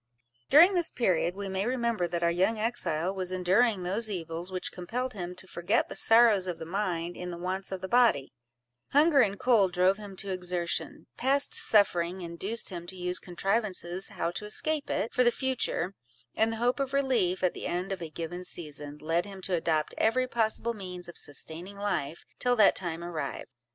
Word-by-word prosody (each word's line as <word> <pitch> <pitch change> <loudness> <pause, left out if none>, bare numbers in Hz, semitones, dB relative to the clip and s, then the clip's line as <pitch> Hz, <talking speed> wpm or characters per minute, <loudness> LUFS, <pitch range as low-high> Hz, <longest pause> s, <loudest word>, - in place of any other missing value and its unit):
During 340 +7 +8
this 350 -3 +2
period, 180 -6 +1
we 200 0 -5
may 190 +2 -2
remember 235 -7 0
that 170 0 -3
our 170 - +3
young 190 +6 +1
exile 190 -6 -1
was 185 -2 -2
enduring 185 +3 +2
those 210 +5 0
evils 170 -1 -4
which 185 -1 -3
compelled 245 +8 -4
him 180 -3 -6
to 185 - -11
forget 185 +6 0
the - - -7
sorrows 225 -5 +5
of 175 -2 -3
the 165 - -7
mind 175 -2 -2
in 180 - -6
the 170 - -6
wants 185 +2 -3
of 190 -1 -4
the 190 - -4
body: 230 - +3 0.6
hunger 295 0 +6
and 200 -3 0
cold 210 -7 +3
drove 185 +2 +3
him 205 -2 -9
to 195 +1 -5
exertion—past 190 - -1
suffering 185 -3 +4
induced 185 +7 -3
him 175 -2 -7
to 190 - -8
use 180 0 -2
contrivances 190 -1 -2
how 170 - -2
to 210 - -6
escape 300 +7 0
it, 220 - -1
for 250 - +3
the 240 - +5
future—and 195 - -2
the 225 - -4
hope 245 +4 +1
of 275 -1 -2
relief, 240 -11 +1
at 180 - +2
the - - -5
end 180 +3 -2
of 190 -2 -4
a 165 - -5
given 170 +3 -6
season, 150 -4 -4
led 165 +5 -1
him 195 -1 -9
to 185 0 -5
adopt 160 -3 0
every 255 +3 +2
possible 235 -1 0
means 180 -4 -6
of 175 - -10
sustaining 165 +7 -6
life 180 -7 -2 0.2
till 245 0 +2
that 215 -4 +5
time 170 -2 -3
arrived. 155 -6 -5
190 Hz, 190 wpm, -29 LUFS, 175-225 Hz, 0.6 s, During